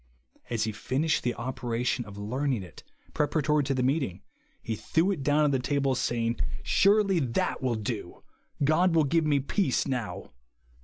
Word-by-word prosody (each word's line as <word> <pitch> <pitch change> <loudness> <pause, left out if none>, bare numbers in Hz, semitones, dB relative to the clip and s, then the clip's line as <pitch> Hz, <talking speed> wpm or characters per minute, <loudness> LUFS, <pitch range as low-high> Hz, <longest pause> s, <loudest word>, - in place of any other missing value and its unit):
As 115 -2 0
he 110 - -1
finished 135 +8 0
the 120 -1 -1
operation 125 -1 -2
of 100 -1 -11
learning 125 +2 -1
it, 90 - -12 0.3
preparatory 150 0 +1
to 135 0 0
the 125 - 0
meeting, 130 - -1 0.4
he 110 - -4
threv/ 170 - +1
it 160 - -6
down 145 +2 +3
on 150 - +3
the 135 - +1
table, 140 +1 0
saying, 115 -2 -1 0.2
"Surely 200 -2 +4
that 125 -6 -1
will 125 -3 0
do, 105 -4 -5 0.4
God 165 +4 +3
will 160 - +5
give 160 +2 +1
me 145 -2 +3
peace 140 - 0
now." 125 - -4
135 Hz, 165 wpm, -28 LUFS, 115-150 Hz, 0.4 s, will